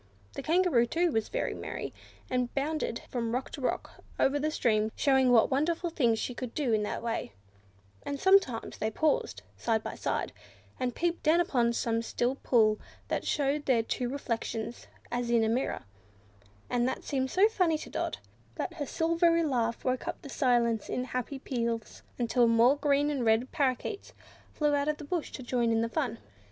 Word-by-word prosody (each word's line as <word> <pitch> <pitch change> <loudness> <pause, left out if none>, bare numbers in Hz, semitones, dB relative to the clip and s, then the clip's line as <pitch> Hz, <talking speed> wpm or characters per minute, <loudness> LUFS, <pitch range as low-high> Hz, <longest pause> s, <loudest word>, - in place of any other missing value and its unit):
The - - -5
Kangaroo, 330 -8 +3
too, 340 +6 +1
was 220 -4 -1
very - - -1
merry, - - -5 0.3
and 250 -1 -1
bounded 285 -3 -1
from 235 -2 -1
rock 260 - -3
to 280 - -7
rock 255 - -3 0.2
over 280 +2 +3
the 305 +2 0
stream, 220 -7 +1
showing 265 -2 +3
what 235 +1 +5
wonderful 330 +5 0
things 235 -8 +2
she 250 - -3
could 245 -1 -6
do 270 -7 +1
in 215 - +3
that 210 - -3
way; 230 - -3 0.7
and 280 - -4
sometimes 380 -12 +3
they 220 - 0
paused, 320 - 0
side 220 -2 0
by - - -4
side, - - -2 0.5
and 250 -2 -1
peeped 340 0 -1
down 320 +2 +4
upon 245 -9 +2
some 230 -1 0
still 240 +2 0
pool 220 -5 +3 0.3
that - - -2
showed 290 +1 0
their 240 -4 +3
two 245 +2 -2
reflections 235 -3 -4 0.2
as 240 0 -1
in 235 -1 +4
a - - +2
mirror; 245 +4 -1 0.8
and 245 0 +1
that 260 - -3
seemed 265 -2 -1
so 385 +8 +5
funny 360 -8 +1
to - - -9
Dot, - - -2 0.4
that 360 - -3
her 295 -5 -4
silvery 335 0 +2
laugh 235 -6 -1
woke 255 0 0 0.2
the 280 - -8
silence 235 -5 +1
in 250 - -1
happy 255 +2 -4
peals, 235 -4 -3 0.2
until 240 0 +3
more 230 +4 +5
green 290 0 +2
and 275 -4 -1
red 225 +3 +2
Parrakeets 275 - -1 0.4
flew 295 -1 +1
out 285 0 +1
of 300 0 0
the - - -9
bush 330 +2 -3
to 260 - -6
join 240 -1 +1
in 225 0 +2
the 230 - +1
fun. 270 -4 -1
255 Hz, 185 wpm, -30 LUFS, 235-300 Hz, 0.8 s, what